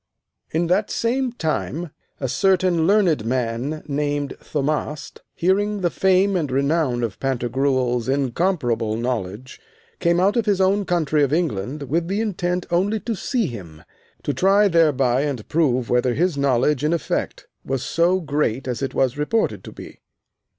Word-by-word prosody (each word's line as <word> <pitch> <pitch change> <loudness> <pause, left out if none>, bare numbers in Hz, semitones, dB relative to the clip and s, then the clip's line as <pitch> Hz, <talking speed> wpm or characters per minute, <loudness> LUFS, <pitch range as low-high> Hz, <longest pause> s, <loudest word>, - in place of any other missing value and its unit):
In 165 +2 0
that 185 +5 +1
same 250 +2 0
time 165 - -3 0.3
a 130 - -2
certain 180 +1 +2
learned 185 - +3
man 125 +5 -2
named 145 -1 -2
Thaumast, 150 +1 -3
hearing 200 +3 +1
the 175 -2 +1
fame 190 +1 +2
and 160 -6 0
renown 140 -2 +1
of 110 -4 -4
Pantagruel's 130 -1 0
incomparable 130 - 0
knowledge, 120 0 -4 0.4
came 170 0 +2
out 195 +3 +3
of 235 -3 0
his 200 -2 +2
own 195 +2 +2
country 155 -4 +1
of 140 -2 +2
England 145 - -1
with 165 +6 -1
an 195 - -1
intent 180 -5 -1
only 200 +5 +1
to 235 - -2
see 230 +3 -1
him, 90 - -8 0.4
to 145 - -1
try 200 +4 +4
thereby 140 -8 +3
and 140 -7 -3
prove 130 -7 +1
whether 125 0 +2
his 175 +1 +1
knowledge 140 0 +1
in 155 +2 +2
effect 170 - -2 0.2
was 135 -1 -2
so 175 +5 +2
great 145 -6 -1
as 125 0 -3
it 135 - -3
was 130 +1 +1
reported 220 +10 0
to - - -8
be. - - -11
150 Hz, 155 wpm, -22 LUFS, 130-180 Hz, 0.4 s, try